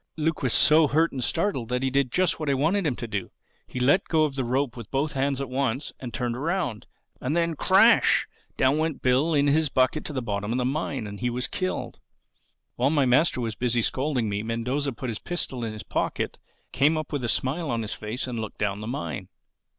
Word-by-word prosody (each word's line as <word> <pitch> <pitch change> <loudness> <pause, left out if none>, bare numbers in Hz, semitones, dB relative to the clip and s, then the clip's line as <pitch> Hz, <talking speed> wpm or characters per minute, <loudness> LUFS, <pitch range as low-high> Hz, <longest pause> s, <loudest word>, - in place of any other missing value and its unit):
Luke 160 0 0
was 125 - 0
so 155 +4 +5
hurt 160 +4 +2
and 130 -2 -4
startled 160 - -1
that 125 +1 -1
he 130 - +1
did 135 -2 +1
just 185 -3 +1
what 155 -2 -2
I 140 - +3
wanted 165 +7 +1
him 135 - 0
to 120 - -6
do: 100 -4 -3 0.4
he 125 - -5
let 145 +10 +3
go 155 -2 +3
the 135 -1 -3
rope 130 +1 0
with 115 -4 -9
both 140 +3 -1
hands 135 0 0
at 140 - -3
once 130 +1 -2
and 125 -2 -6
turned 120 0 -2
round. 165 - -2 0.3
And 145 +5 -1
then, 170 -1 +1
Crash! - - +5 0.3
down 135 +4 +3
went 160 -1 -2
Bill 135 +6 +3
in 145 -1 +3
his 150 +1 +3
bucket 130 +4 +2
to 150 - -4
the 135 - -1
bottom 105 -1 -2
of 120 - 0
the 125 - 0
mine 135 -3 -2
and 100 -1 -7
he 125 - 0
was 125 +1 -1
killed. 185 0 -3 0.8
"While 125 +3 +3
my 145 -3 +3
master 130 +3 +3
was 115 -2 -2
busy 120 +1 0
scolding 130 -3 0
me 100 0 -1
Mendoza 125 +6 -2
put 125 +1 -5
his 110 - -5
pistol 135 -8 -3
in 115 - -2
his 110 0 -7
pocket, - - -2 0.3
came 150 +4 +3
up 155 -1 -5
with 140 -3 -2
a 120 - -1
smile 140 +7 0
on 115 -2 -1
his 110 - -4
face 110 +5 -4
and 125 -3 -4
looked 110 -1 -6
down 105 0 -1
the 110 - -5
mine. 85 - -4
130 Hz, 225 wpm, -26 LUFS, 120-150 Hz, 0.8 s, so